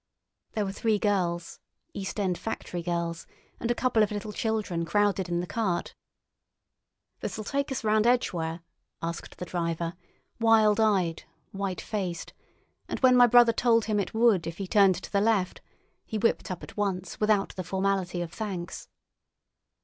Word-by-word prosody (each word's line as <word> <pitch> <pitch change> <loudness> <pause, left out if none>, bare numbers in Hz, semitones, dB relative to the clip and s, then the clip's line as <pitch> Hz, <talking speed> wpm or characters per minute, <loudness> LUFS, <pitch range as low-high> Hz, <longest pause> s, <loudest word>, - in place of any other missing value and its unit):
There 210 -2 0
were 195 - -3
three 215 +2 +1
girls, 180 -5 -1 0.3
East 195 +2 -4
End 185 -3 +1
factory 180 -3 -5
girls, 170 -1 -3 0.3
and 230 - -2
a 240 - +2
couple 235 -3 +2
of 210 - +3
little 210 0 -4
children 215 -7 -1
crowded 200 0 +1
in 175 0 0
the - - -3
cart. 185 -4 -2 1.3
"This'll 215 - -4
tike 280 +5 -2
us 265 - -3
rahnd 215 +1 +3
Edgware?" 170 -9 0 0.4
asked 170 0 -5
the 180 - -5
driver, 170 -1 -2 0.5
wild 225 -2 +5
eyed, 190 -7 +2 0.3
white 195 -2 -3
faced; 185 -6 -4 0.6
and - - -3
when 255 -1 +6
my 245 0 +8
brother 240 0 +6
told 230 -1 +3
him 215 -2 +1
it 200 +2 -3
would 220 -7 +4
if 165 - -5
he 195 - -3
turned 195 -1 +5
to - - -8
the 200 - +2
left, 205 -4 +1 0.4
he 220 - -4
whipped 230 +2 +1
up 180 -2 -5
at - - -10
once 190 -3 -2
without 210 -2 +2
the 185 - -4
formality 190 -1 -1
of 165 - -8
thanks. 190 -6 -5
200 Hz, 165 wpm, -28 LUFS, 175-220 Hz, 1.3 s, my